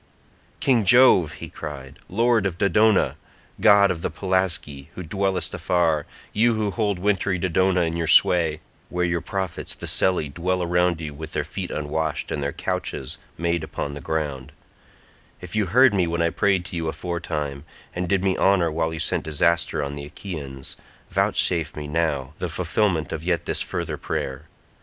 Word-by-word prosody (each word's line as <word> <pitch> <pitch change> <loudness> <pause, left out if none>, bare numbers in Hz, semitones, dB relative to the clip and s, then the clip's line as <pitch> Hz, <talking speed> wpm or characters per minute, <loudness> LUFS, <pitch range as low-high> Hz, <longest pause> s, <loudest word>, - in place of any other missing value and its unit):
"King 125 -5 +3
Jove," 95 - +6
he - - -8
cried, 70 -2 -8
"lord 115 +1 +2
of 90 -3 -5
Dodona, 105 +2 +3 0.4
god 100 -1 +6
of 80 - -4
the - - -1
Pelasgi, 95 -7 -1
who 90 - -6
dwellest 95 0 -1
afar, 80 -4 +1 0.3
you 115 +2 +3
who 105 -2 -1
hold 100 0 0
wintry 95 0 0
Dodona 95 +1 +2
in 85 0 -1
your 85 -1 -2
sway, 80 -3 +4 0.3
where 90 0 0
your 85 -1 -1
prophets 95 -3 -4
the - - -8
Selli 90 -5 +3
dwell 90 +5 -1
around 90 -1 +1
you 75 -2 -5
with 80 +2 -8
their 75 - 0
feet 90 +4 -6
unwashed 75 +1 -2
and 75 - -2
their 70 0 -1
couches 65 -1 -4 0.2
made 85 0 0
upon 70 -2 -4
the 75 - -7
ground—if 75 +5 -8
you 105 -2 +1
heard 125 +5 +5
me 90 -3 +2
when 85 0 0
I 85 - +1
prayed 95 -1 +1
to - - -6
you 80 -1 -2
aforetime, 80 -5 -4 0.3
and 90 0 -3
did 95 -2 +1
me 95 -1 +2
honour 95 -4 +3
while 80 +1 -1
you 80 - -5
sent - - 0
disaster 85 +1 +1
on 70 0 -4
the 70 0 -7
Achaeans, 70 -5 -8 0.3
vouchsafe 85 -4 +2
me 75 -1 -6
now 75 -4 -1
the 90 - -2
fulfilment 85 0 0
of 80 - -4
yet 85 -1 0
this - - +1
further - - -3
prayer. 70 +4 -4
85 Hz, 170 wpm, -23 LUFS, 75-95 Hz, 0.4 s, Jove